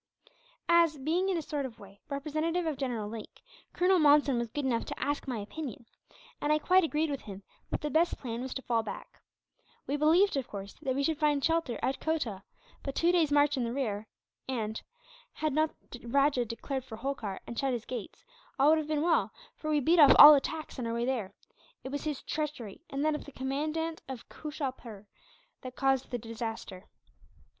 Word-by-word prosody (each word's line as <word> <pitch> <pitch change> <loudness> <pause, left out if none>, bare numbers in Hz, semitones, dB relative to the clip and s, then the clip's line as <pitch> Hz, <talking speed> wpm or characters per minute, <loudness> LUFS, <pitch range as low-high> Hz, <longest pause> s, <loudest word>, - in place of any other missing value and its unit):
"As 335 -3 +4
being, 330 +8 0
in 370 - +1
a 325 - -3
sort 290 -1 -3
of 255 -4 -7
way, 200 0 -15
representative 310 +5 -1
of 315 -2 -1
General 245 -6 -3
Lake, 220 0 -9 0.3
Colonel 365 +1 +3
Monson 290 -4 +5
was 235 - -2
good 290 +4 -3
enough 235 -3 +1
to - - -6
ask 290 0 -2
my 250 -3 -2
opinion; 235 +3 -6 0.6
and 295 - +1
I 305 - +5
quite 365 +4 +4
agreed 310 -1 0
with 280 - -3
him 195 -1 -9 0.3
that - - -2
the 300 - -3
best 335 +2 +2
plan 235 -2 -5
was 260 0 -5
to 265 - -4
fall 230 -2 +1
back. 225 - -9 0.6
We 285 - -1
believed, 325 +6 +4
of 260 -2 -2
course, 200 -3 -7
that 260 -1 -1
we 280 - 0
should 310 +1 0
find 295 -3 +2
shelter 325 -7 0
at 265 - 0
Kotah, 270 -12 -2 0.4
but 275 - -5
two 340 +1 +3
days' 330 -4 +2
march 290 0 +4
in 255 - 0
the 230 - -2
rear 220 -6 -2 0.4
and, 220 -4 -2 0.5
had 310 -2 -1
not 310 +2 +2 0.2
the 245 - -9
rajah 275 0 +3
declared 260 +4 -4
for 225 - -9
Holkar, 225 -6 -4
and 235 - -5
shut 270 -1 +1
his 240 -2 -3
gates, 255 - -7 0.3
all 280 +2 +5
would 315 0 +5
have 305 - -4
been 305 -1 0
well; 335 0 +2 0.2
for 310 - -5
we 300 -1 +3
beat 330 +5 +3
off 290 - +9
all 300 +1 +12
attacks, 300 +1 -2
on 240 - -2
our 230 - -2
way 235 0 0
there. 225 -7 -2 0.5
It 265 - -5
was 285 +2 -4
his 300 -3 -3
treachery, 295 -9 -4
and 275 +2 -2
that 310 - +3
of 300 - -5
the 285 - -10
commandant 305 +5 -2
of 260 -3 -7
Kooshalpur, 260 -9 -6 0.6
that 255 -1 -8
caused 270 -1 +1
the 245 - -2
disaster." 225 -4 -6
275 Hz, 205 wpm, -30 LUFS, 240-310 Hz, 0.6 s, all